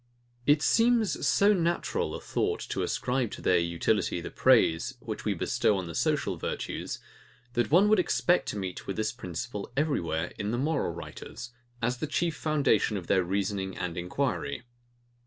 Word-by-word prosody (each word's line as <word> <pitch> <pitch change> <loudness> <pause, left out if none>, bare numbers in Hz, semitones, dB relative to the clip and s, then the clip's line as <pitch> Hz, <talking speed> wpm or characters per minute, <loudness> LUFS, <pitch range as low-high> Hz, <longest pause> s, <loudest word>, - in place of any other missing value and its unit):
It 145 +1 +5
seems 230 - +3
so 200 +9 +5
natural 170 -2 0
a - - -5
thought - - -1
to - - -1
ascribe 125 -2 0
to - - -7
their 90 - +4
utility 85 +3 0
the 85 - -7
praise, 115 -11 +3
which - - -6
we - - +1
bestow 105 - +1
on 95 - -3
the 85 - -7
social - - 0
virtues, - - -4 0.6
that 120 -2 +1
one 180 +8 +6
would 215 -1 +5
expect 180 0 +2
to - - -4
meet 95 -2 -5
with 100 - -2
this 110 0 0
principle 100 -1 -6
everywhere 90 - 0
in 105 - -2
moral 135 - 0
writers, 85 +7 -8 0.3
as 120 +1 0
the 155 - -2
chief 165 +2 0
foundation 140 -9 +2
of 90 - -6
their 95 +1 +3
reasoning 95 +1 -2
and 90 -2 -3
enquiry. 120 +7 -2
115 Hz, 165 wpm, -29 LUFS, 95-155 Hz, 0.6 s, one